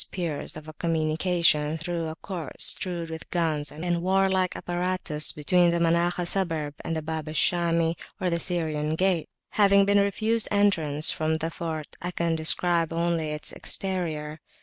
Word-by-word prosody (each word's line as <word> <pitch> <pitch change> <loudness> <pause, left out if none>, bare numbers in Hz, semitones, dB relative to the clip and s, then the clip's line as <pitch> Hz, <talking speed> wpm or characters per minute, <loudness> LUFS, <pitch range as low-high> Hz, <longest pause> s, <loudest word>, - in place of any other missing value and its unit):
394]a 155 -2 -5
communication 160 -1 +1
through 165 0 -3
a 160 - -5
court 175 -3 -7
strewed 170 -3 0
with 160 0 -8
guns 155 -4 -1
and 170 +2 -2
warlike 190 0 +2
apparatus, 175 -3 0
between 175 +4 +3
the 170 - +1
Manakhah 170 +1 +1
Suburb 165 -6 0
and 165 - -3
the 160 - -3
Bab 160 0 -4
al 155 - -6
Shami, 170 0 +2 0.2
or 180 - 0
the 170 - 0
Syrian 155 -3 -1
Gate. 185 -2 +1 0.2
Having 200 -1 +4
been 200 0 +4
refused 215 +3 +1
entrance 165 -8 +3
into 160 0 +1
the 165 +1 -3
fort, 160 -3 -5
I 175 - -3
can 170 -2 -1
describe 165 +1 +2
only 165 -1 0
its 150 0 -3
exterior. 160 -5 -2
170 Hz, 150 wpm, -26 LUFS, 155-180 Hz, 0.2 s, Having